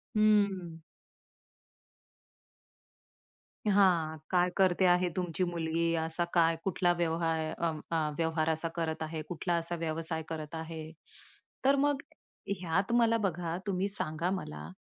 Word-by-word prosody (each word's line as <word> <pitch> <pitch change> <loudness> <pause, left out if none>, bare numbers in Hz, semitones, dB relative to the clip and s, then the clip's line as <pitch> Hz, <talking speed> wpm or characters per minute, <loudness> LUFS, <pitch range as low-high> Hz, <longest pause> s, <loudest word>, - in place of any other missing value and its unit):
हं. 200 -6 +2 2.9
हां, 180 -6 +3
काय 180 -1 +3
करते 185 -1 +4
आहे 180 0 +4
तुमची 180 0 -1
मुलगी? 170 -1 0
असा 160 +1 -1
काय 165 -1 +4
कुठला 180 -2 +2
व्यवहार 165 -1 0
अ, 170 -1 0
म - - -7
अ, 155 -2 +1
व्यवहार 160 -1 +1
असा 160 +1 +2
करत 160 -1 -2
आहे? 155 0 -4
कुठला 175 0 -2
असा 170 +1 0
व्यवसाय 160 0 -2
करत 155 0 -5
आहे? 160 -1 -6 0.7
तर 275 +1 +6
मग 285 0 +1 0.6
ह्यात 185 +4 0
मला 230 -1 +4
बघा 170 0 -3
तुम्ही 190 0 0
सांगा 165 -3 -2
मला, 75 - -5
170 Hz, 125 wpm, -31 LUFS, 160-185 Hz, 2.9 s, तर